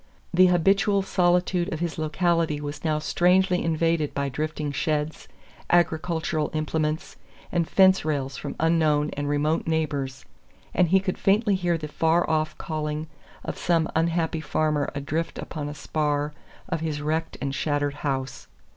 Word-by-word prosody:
The 185 +1 +6
habitual 195 +3 +3
solitude 180 -1 +1
of 155 - -3
his 170 -1 -3
locality 165 -1 +1
was 145 0 -6
now 155 -2 +1
strangely 180 +4 +2
invaded 165 -1 0
by 140 0 -1
drifting 150 +2 -3
sheds, 150 +1 -2 0.4
agricultural 160 -2 +1
implements, 155 0 -2 0.3
and 170 -2 +1
fence 190 0 +5
rails 140 -3 -2
from - - -6
unknown 155 -2 +2
and 145 0 -3
remote 150 +3 0
neighbors, 145 -5 -2 0.5
and 180 - +3
he 190 +3 +4
could 185 -1 -3
faintly 205 +2 +3
hear 175 -3 +1
the 155 -1 -5
far 160 +3 +2
off 155 0 0
calling 155 0 -3 0.4
of - - -5
some 165 -2 +2
unhappy 165 0 +1
farmer 155 -2 0
adrift 150 +4 -3
upon 145 -2 -5
a 145 - -7
spar 150 0 -1 0.3
of 165 -3 -2
his 155 -2 -2
wrecked 160 +2 -2
and 140 -1 -2
shattered 145 0 0
house. 135 -3 -3
155 Hz, 145 wpm, -25 LUFS, 150-170 Hz, 0.5 s, The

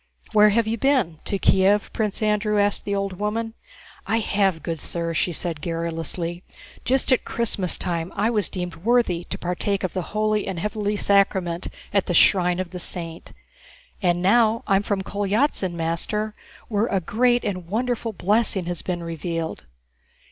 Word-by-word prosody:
"Where 210 0 +7
have 225 +2 +2
you 225 +1 -2
been? 250 - +2
To 200 - -1
Kiev?" 195 +2 +3
Prince 215 -1 -1
Andrew 210 0 +2
asked 205 0 +1
the 200 - -1
old 195 -2 -3
woman. 225 +2 -2 0.5
"I 225 - +2
have, 195 -7 +1
good 165 -2 -3
sir," 170 +2 -3
she 165 - +1
answered 165 -2 -3
garrulously. 165 +1 -3 0.4
"Just 265 +1 +1
at 255 - +4
Christmastime 180 -6 -1
I 215 +3 +1
was 210 -5 +1
deemed 180 -1 -5
worthy 195 -4 +1
to - - -5
partake 185 +3 -1
of 185 - -2
the 185 - -1 0.2
holy 215 -1 +1
and 190 -2 -3
heavenly 210 +3 -1
sacrament 190 -4 +2 0.3
at 200 -2 +2
the 175 - 0
shrine 180 0 +5
of 185 -2 -3
the 180 - -6
saint. 170 -1 -7 0.7
And 175 -2 +1
now 225 +3 +4
I'm 195 0 +3
from 200 -1 -1
Kolyázin, 205 0 0
master, 170 +6 -2 0.3
where 215 +1 +1
a 195 - +1
great 240 +7 +2
and 185 -4 -3
wonderful 235 +3 -1
blessing 205 -1 +1
has 175 -1 -4
been 175 -2 -3
revealed." 165 - -4
195 Hz, 160 wpm, -23 LUFS, 175-215 Hz, 0.7 s, Where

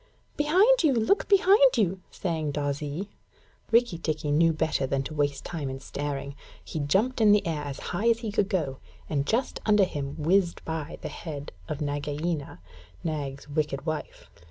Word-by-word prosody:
'Behind 370 +11 +4
you! 300 -4 +4
Look 230 - +2
behind 410 +5 +6
you!' 190 -2 +1
sang 160 -4 -2
Darzee. 145 +6 -3 0.6
Rikki 230 -7 +3
tikki 155 -2 -2
knew 165 +3 +4
better 155 -3 0
than 135 0 0
to 155 - -6
waste 145 -2 -1
time 155 -6 -4
in 130 0 -5
staring. 140 0 -4 0.3
He 160 - -4
jumped 205 - +1
up 220 - +6
in - - +7
the 210 - +3
air 160 -3 -1
as 140 -1 -5
high 210 +7 +2
as 230 0 +2
he 220 -3 -3
could 200 -1 +1
go, 150 -10 -1 0.3
and 140 -2 -1
just 245 +4 0
under 210 -2 +4
him 140 -6 -3
whizzed 175 +3 +1
by 160 -2 -4
the - - -3
head 145 -4 -7 0.2
of 150 - -4
Nagaina, 145 - -3 0.4
Nag's 145 -3 -4
wicked 145 -1 -2
wife. 155 -2 -5
160 Hz, 175 wpm, -27 LUFS, 145-210 Hz, 0.6 s, in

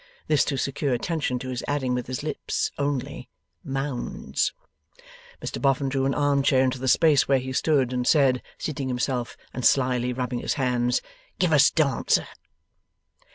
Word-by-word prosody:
This, 150 -3 +3
to 140 - -2
secure 140 0 -1
attention 145 -1 -2
to 130 +1 -6
his 125 -2 -4
adding 135 -3 0
with 125 -1 -2
his 130 +2 -4
lips 155 - -2
only, 140 -2 -3 0.3
'Mounds!' 135 -1 -2 0.9
Mr - - -5
Boffin 135 0 +2
drew 135 0 0
an 135 - 0
arm 145 -1 +2
chair 130 -1 +3
into 130 0 0
the 130 - -3
space 145 +1 +4
where 135 - +4
he 130 0 -4
stood, 135 -3 +1
and 125 0 -1
said, 135 -5 +4 0.2
seating 145 -3 -4
himself 125 -1 -2 0.2
and 125 - -5
slyly 125 -2 +2
rubbing 125 -1 -3
his - - -2
hands: 125 -3 0 0.3
'Give 180 -3 +2
us 145 - +6
Dancer. 145 -6 +1
130 Hz, 160 wpm, -25 LUFS, 125-145 Hz, 0.9 s, us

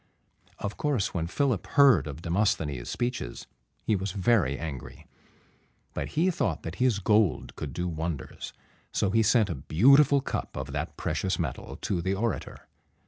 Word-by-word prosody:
Of 105 0 -5
course, 140 -9 0
when 85 -2 -1
Philip 125 +1 0
heard 140 - +5
of 75 +2 -7
Demosthenes' 80 - 0
speeches, 120 - -3 0.4
he 110 - +2
was 95 0 -3
very 95 - +2
angry; 75 -5 -7 0.9
but - - -5
he 180 +4 +4
thought 175 - -1
that - - -6
his 125 -5 +3
gold 105 -2 +1
could 75 - -5
do 90 +6 -3
wonders, 80 -3 -4 0.4
so 95 - 0
he 115 - +4
sent 110 -2 +3
a 70 -3 -7
beautiful 140 - +6
cup 135 - -4
of 70 +1 -5
that 70 +4 -4
precious 95 - -1
metal 75 -8 -4
to 90 -3 -1
the 95 +3 0
orator. 115 +3 -3
95 Hz, 155 wpm, -28 LUFS, 80-120 Hz, 0.9 s, beautiful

